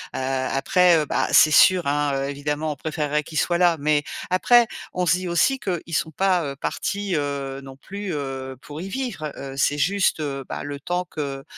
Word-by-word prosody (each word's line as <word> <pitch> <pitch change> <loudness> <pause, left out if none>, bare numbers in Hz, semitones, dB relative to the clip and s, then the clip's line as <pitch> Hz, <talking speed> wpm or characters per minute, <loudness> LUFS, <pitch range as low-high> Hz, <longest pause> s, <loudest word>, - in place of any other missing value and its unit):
Heu, - - -2
après, 135 +7 +2
heu 150 - 0
bah, - - 0
c'est 155 - +7
sûr, 180 +1 +5
hein, 145 -1 0
évidemment, 150 +2 -2
on - - -13
préférerait 150 0 -2
qu'ils 155 +1 -3
soient 175 -1 +1
là. 175 -2 +3
Mais 150 0 +2 0.3
après, 235 +6 +5 0.3
on 180 -1 -1
se 165 - +5
dit 185 0 -4
aussi 175 +11 +2
qu'ils 175 -7 -4
sont 160 - -1
pas, 185 0 +1
heu, 140 0 -4
partis, 200 +5 -2
heu, 140 -2 -3
non 135 -1 -11
plus, 200 +3 -6
heu, 135 -2 -5
pour 150 +1 -9
y 190 - -5
vivre. 190 - -4
Heu, 135 -1 -7
c'est 145 +1 +1
juste, 195 0 +2
heu, 135 -3 -3
bah - - -5
le 145 -1 -6
temps 180 +4 -2
que, 140 -3 -5
150 Hz, 200 wpm, -23 LUFS, 140-180 Hz, 0.3 s, c'est